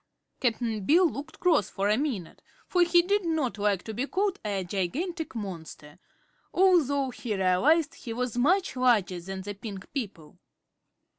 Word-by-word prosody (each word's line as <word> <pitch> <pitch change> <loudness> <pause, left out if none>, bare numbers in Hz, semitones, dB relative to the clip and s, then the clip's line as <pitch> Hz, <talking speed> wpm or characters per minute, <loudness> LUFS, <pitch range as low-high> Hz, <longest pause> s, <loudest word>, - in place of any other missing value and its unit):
Cap'n 225 -3 -1
Bill 340 - +5
looked 300 +1 -7
cross 345 - +3
for 195 +1 -1
a 210 - +4
minute, 240 - -3 0.3
for 360 - +2
he 345 0 +5
did 400 +3 +1
not 310 -10 -1
like 200 -3 +1
to 220 - -6
be 250 +6 -2
called 395 +2 0
a 200 -3 -2
"gigantic 265 - -3
monster," 165 -7 -7 0.5
although 285 -8 +3
he 220 -2 -4
realized 270 - +3
he 235 - -8
was 245 0 -2
much 355 +8 +2
larger 220 -8 +2
than 190 +2 -6
the 205 +1 -5
pink 200 -2 -8
people. 195 - -6
245 Hz, 155 wpm, -28 LUFS, 195-320 Hz, 0.5 s, Bill